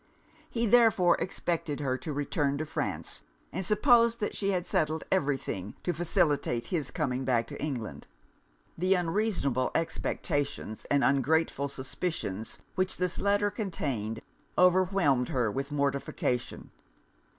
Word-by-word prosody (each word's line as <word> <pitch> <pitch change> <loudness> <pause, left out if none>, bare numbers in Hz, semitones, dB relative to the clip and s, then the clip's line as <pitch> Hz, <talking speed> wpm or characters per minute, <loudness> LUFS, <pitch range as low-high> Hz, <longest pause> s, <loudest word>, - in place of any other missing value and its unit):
He 235 0 0
therefore 215 -6 +5
expected 165 -5 -2
her 135 -3 0
to 130 +4 -5
return 145 0 0
to 155 - -2
France, 90 - -3 0.3
and 190 - -2
supposed 235 +3 +4
that 210 - -2
she 200 - 0
had 180 -3 0
settled 160 -2 0
every 145 -7 +2
thing 95 -5 -5
to 175 - 0
facilitate 150 -7 +1
his 155 -5 -2
coming 135 -5 -1
back 120 -3 +2
to - - -6
England.' 130 -8 -4 0.7
The 185 +3 +3
unreasonable 170 - 0
expectations, 145 -7 -2
and 140 -1 +2
ungrateful 140 +1 +2
suspicions, 130 - -4 0.2
which 185 0 0
this 180 0 -1
letter 205 +1 +2
contained, 130 - -3 0.4
overwhelmed 180 -8 +4
her 120 -5 +1
with 135 +5 -3
mortification. 140 -3 -1
150 Hz, 130 wpm, -29 LUFS, 135-185 Hz, 0.7 s, therefore